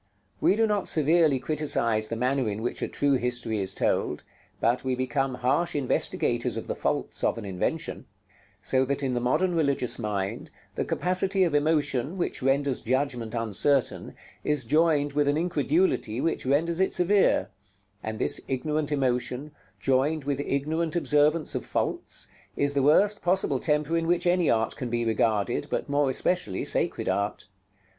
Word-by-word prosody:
We - - +3
do 225 +1 +3
not 210 -3 0
severely 155 -1 +3
criticise 125 -7 0
the 115 - -4
manner 125 0 0
in 105 +2 -4
which 120 - -3
a - - -1
true 145 -1 0
history 120 -3 0
is 95 -1 -2
told, - - -1 0.4
but 120 +2 +1
we 130 -1 0
become 130 +1 -1
harsh 135 +8 0
investigators 140 -4 0
of - - -5
the - - -3
faults - - -2
of - - +1
an 115 - -6
invention; 95 -2 -3 0.6
so 130 0 +2
that 140 +2 -2
in 130 -2 0
the 120 - 0
modern 155 +9 +1
religious 140 -7 0
mind, 100 -3 -3 0.2
the - - -2
capacity 185 +2 0
of 170 -4 0
emotion, 145 0 +1
which 175 - -2
renders 135 0 +1
judgment 125 -2 -1
uncertain, 115 +4 0 0.3
is 150 -5 -1
joined 150 0 +2
with 145 0 +1
an 145 +1 +2
incredulity 155 - 0
which 150 -2 -1
renders 165 +5 +1
it 190 - +1
severe; 185 - +2 0.5
and 110 0 -5
this - - +2
ignorant 150 +3 -1
emotion, 130 +1 -1 0.3
joined 135 +6 +1
with 140 0 -2
ignorant 155 +4 -1
observance 150 -1 +2
of - - -3
faults, - - -2 0.3
is 145 0 +1
the 140 - +1
worst 195 +9 +3
possible 175 -7 +1
temper 150 +2 0
in 165 0 0
which 175 +1 +1
any 175 -1 +3
art 110 0 +1
can 125 - -5
be 120 0 -1
regarded, 110 -3 0
but - - -2
more 145 -1 +2
especially 130 - -1
sacred - - -1
art. 100 +1 -1
140 Hz, 165 wpm, -26 LUFS, 125-160 Hz, 0.6 s, We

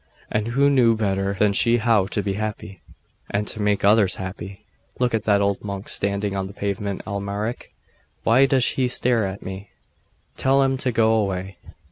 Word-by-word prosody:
And 110 0 -1
who 135 +4 +2
knew 120 -4 +4
better 100 -2 -1
than 100 +1 +2
she 115 +3 +3
how 110 -4 +2
to 105 0 -2
be 100 - -1
happy, 105 -3 -5 0.5
and 100 +1 -1
to 110 - -4
make 105 -1 +1
others 105 -2 +4
happy?.... 95 +1 -8 0.3
'Look 125 -1 0
at 110 -1 -1
that 100 -1 +3
old 100 -1 0
monk 100 -1 -6
standing 100 0 -1
on 95 -1 -2
the 100 - -11
pavement, 100 -1 -3
Amalric! 100 +3 -4 0.5
Why 125 +4 +5
does 130 -2 +3
he 130 -2 0
stare 120 -4 +1
so 95 - -4
at 100 - -12
me? 95 +1 -8 0.7
Tell 135 +1 +3
him 135 0 +1
to 130 -1 -1
go 110 -1 +3
away. 95 -3 -2
105 Hz, 185 wpm, -22 LUFS, 100-115 Hz, 0.7 s, Why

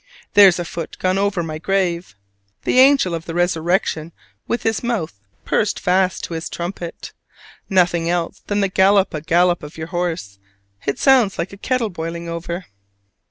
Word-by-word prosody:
There's 200 -4 +7
a 175 - -3
foot 165 0 -6
gone 185 +1 0
over 200 -3 0
my 155 -1 -5
grave! 180 - -1 0.5
The 255 - +2
angel 265 -9 +5
of 165 -1 -4
the 165 - -6
resurrection 170 -2 0 0.3
with 235 - -2
his 225 -1 0
mouth 195 - -3 0.3
pursed 210 - 0
fast 185 0 +1
to - - -5
his 165 0 -4
trumpet! 175 -1 -6 0.6
Nothing 175 -3 +2
else 175 +1 -1
than 205 0 0
the 195 - +2
gallop 190 +1 +3
a 155 - -3
gallop 175 +2 +2
of 150 +1 -10
your 160 0 -6
horse: 165 - -3 0.5
it 140 - 0
sounds 250 -7 +4
like 170 +4 -3
a - - -7
kettle 240 0 -1
boiling 170 0 -5
over! 170 +2 -5
175 Hz, 165 wpm, -20 LUFS, 165-195 Hz, 0.6 s, There's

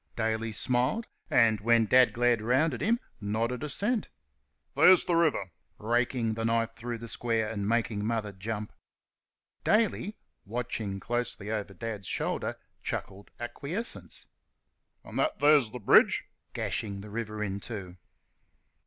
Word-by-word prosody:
Daly 110 0 -1
smiled 125 - 0 0.2
and, 110 -4 +4
when 115 +1 +4
Dad 125 +3 +6
glared 120 -1 +2
round 130 +7 +2
at 120 - -5
him, 230 +4 +3 0.2
nodded 115 +5 -1
assent. 205 - -1 0.7
"There's 185 -1 +7
th' - - -16
river!" 160 - +2 0.3
raking 120 0 0
the 115 +1 -3
knife 115 0 +1
through 120 0 -5
the 115 +1 -8
square, 115 -1 0
and 105 -2 -2
making 115 -3 0
Mother 110 -2 -1
jump. 105 +2 -5 0.9
Daly, 215 -1 +1 0.3
watching 110 -3 -3
closely 120 -2 -2
over 105 -3 -3
Dad's 105 -1 -5
shoulder, - - -1 0.3
chuckled 100 +1 -5
acquiescence. 145 - -5 0.8
"An' - - -8
that 315 - +1
's 145 -5 +5
th' 120 -2 -9
bridge?" - - +6 0.3
gashing 100 -2 -3
the 105 0 -10
river 110 -1 -3
in 100 -1 -3
two. 95 -5 -7
115 Hz, 135 wpm, -29 LUFS, 105-125 Hz, 0.9 s, There's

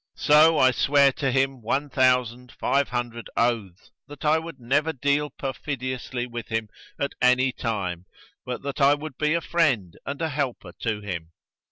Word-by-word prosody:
So 155 +2 +5
I 130 -2 +5
sware 140 +2 +4
to 135 0 -1
him 135 0 0
one 135 +6 -1
thousand 125 -2 +1
five 140 0 0
hundred 120 -2 -4
oaths 110 -6 -1 0.2
that 145 0 -10
I 155 +2 +4
would 160 -4 -9
never 140 +7 +1
deal 145 +2 0
perfidiously 130 -3 -4
with 120 -2 -7
him 110 -1 -2 0.3
at 140 - -1
any 125 +1 +4
time, 95 -8 -3 0.4
but 125 0 -5
that 140 +1 -4
I 140 +1 +6
would 150 -2 -8
be 150 +1 +2
a 170 - 0
friend 135 - +1
and 140 0 -5
a 165 -1 -1
helper 140 -4 -3
to 110 -3 -2
him. 85 -5 -6
130 Hz, 170 wpm, -25 LUFS, 120-145 Hz, 0.4 s, I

